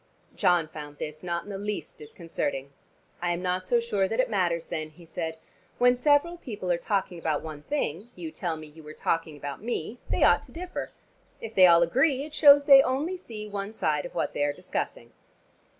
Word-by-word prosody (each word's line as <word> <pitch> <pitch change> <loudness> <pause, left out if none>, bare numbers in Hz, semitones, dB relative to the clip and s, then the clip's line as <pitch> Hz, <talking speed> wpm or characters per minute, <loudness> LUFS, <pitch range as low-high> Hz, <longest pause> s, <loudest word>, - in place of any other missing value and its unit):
John 175 -3 +3
found 145 -1 -9
this 150 +1 -6
not 170 -1 -2
in 205 - -9
the 195 - -5
least 205 -6 -5
disconcerting. 145 -3 -4 0.5
"I 175 0 +1
am 175 +1 -4
not 185 0 -1
so 240 - +3
sure 205 -5 0
that 225 +5 -3
it 255 - +2
matters 175 -5 +1
then," 155 -1 -4
he 165 +2 -17
said. 160 0 -4 0.4
"When 245 0 +5
several 290 +6 +3
people 205 - -4
are 170 - +1
talking 190 -2 -1
about 155 -3 -1
one 155 -2 -7
thing 210 - -3
you 165 -3 -6
tell 165 0 -3
me 155 - -9
you 155 +1 -14
were 155 0 -11
talking 165 -2 -1
about 145 +2 -6
me 230 0 -4
they - - +1
ought - - +5
to - - -15
differ. 360 +2 -5 0.5
If 225 0 -7
they 185 -3 +8
all 170 0 +7
agree, 265 - +2
it 305 0 -9
shows 285 -2 +7
they 275 -1 +9
only 280 +8 -1
see 225 - -8
one 200 0 -5
side 150 -8 0
of - - -18
what - - -1
they 145 - 0
are 145 0 +1
discussing." - - -5
180 Hz, 210 wpm, -27 LUFS, 160-240 Hz, 0.5 s, they